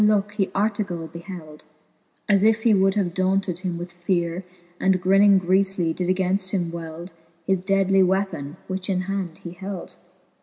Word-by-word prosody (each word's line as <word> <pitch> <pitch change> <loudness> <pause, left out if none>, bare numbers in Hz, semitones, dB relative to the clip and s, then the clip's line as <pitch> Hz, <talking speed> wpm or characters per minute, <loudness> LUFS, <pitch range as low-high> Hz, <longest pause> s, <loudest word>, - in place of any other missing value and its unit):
looke 205 -1 +3
he 205 -2 0
Artegall 200 -5 -1
beheld, 165 -3 -10 0.6
As 200 -1 +4
if 220 0 +3
he 230 - +5
would 195 0 +3
have 185 -5 0
daunted 185 -1 0
him 180 -2 -3
with 175 +1 -6
feare, 175 0 -1 0.4
And 190 -1 +3
grinning 195 +2 +5
griefly, 185 -2 +1
did 180 - -2
againft 185 +1 +1
him 175 -4 -1
weld 170 +1 -7 0.3
His 190 0 +1
deadly 195 0 +3
weapon, 185 -6 0
which 190 0 -4
in 185 -1 +1
hand 185 -3 -3
he 170 - -6
held. 190 0 -7
185 Hz, 160 wpm, -23 LUFS, 175-195 Hz, 0.6 s, he